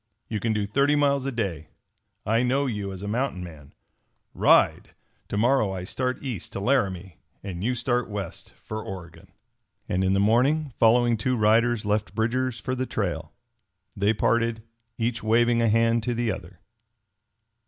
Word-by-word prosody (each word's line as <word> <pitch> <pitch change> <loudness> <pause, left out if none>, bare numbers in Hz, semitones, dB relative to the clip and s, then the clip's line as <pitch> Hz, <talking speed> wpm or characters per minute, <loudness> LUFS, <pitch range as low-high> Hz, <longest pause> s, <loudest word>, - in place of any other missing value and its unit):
"You 110 - -3
can 115 +2 0
do 105 -2 0
thirty 140 +8 +2
miles 140 -2 +2
a - - -1
day. 95 - -3 0.6
I 115 +2 +2
know 130 +3 +1
you 105 -6 -3
as 95 0 -8
a - - -4
mountain 115 -4 -2
man. 75 -5 -11 0.6
Ride! - - +3 0.3
To 100 - -3
morrow 115 -2 +3
I 90 -1 -5
start 125 +7 -3
east 120 -10 -5
to - - -3
Laramie 95 - 0 0.2
and 95 -2 -5
you 125 +3 0
start 120 0 -1
west 100 -4 -6
for 110 0 -6
Oregon!" 85 -4 -9 0.6
And 95 +1 0
in 95 0 +2
the 100 - +2
morning 130 +7 +2
following 120 +1 +4
two 125 +4 0
riders 115 +1 +3
left 105 -1 -1
Bridger's 120 +2 0
for 125 +4 -3
the 130 0 -2
trail. 90 -5 -3 0.6
They 100 +1 +2
parted, 115 +1 +1 0.3
each 115 0 -1
waving 115 +2 +3
a 115 - +3
hand 115 +1 +3
to 120 +2 -2
the 120 -1 0
other. 90 -1 -9
110 Hz, 165 wpm, -25 LUFS, 100-125 Hz, 0.6 s, following